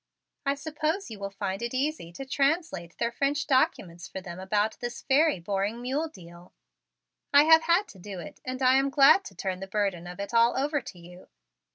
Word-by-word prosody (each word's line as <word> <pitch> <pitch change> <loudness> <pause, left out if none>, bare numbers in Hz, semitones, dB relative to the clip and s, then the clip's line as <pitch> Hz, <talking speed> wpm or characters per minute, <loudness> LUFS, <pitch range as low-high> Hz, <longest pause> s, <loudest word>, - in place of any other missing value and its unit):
I 275 - +2
suppose 310 - -3
you 215 - -8
will 200 0 -4
find 195 0 -4
it 235 +2 -3
easy 275 - -2
to 270 - -7
translate 275 - -1
their 235 0 -1
French 285 +5 0
documents 195 - 0
for - - -7
them 180 -1 -9
about 205 +3 0
this 240 0 -6
very 295 - +3
boring 200 +5 -2
mule 270 +6 -2
deal. 175 - -15 0.8
I 285 +1 +7
have 320 +1 +6
had 345 +5 +3
to 190 - -14
do 195 0 -8
it 165 - -10
and 255 +1 -4
I 255 +1 +5
am 275 +1 +2
glad 280 +7 +6
to - - -10
turn 185 -2 -3
the 195 - -7
burden 195 -4 -1
of 180 +2 -9
it 200 +3 -5
all 235 +1 +4
over 290 +2 0
to 190 - -11
you. 175 +1 -14
235 Hz, 205 wpm, -27 LUFS, 190-285 Hz, 0.8 s, I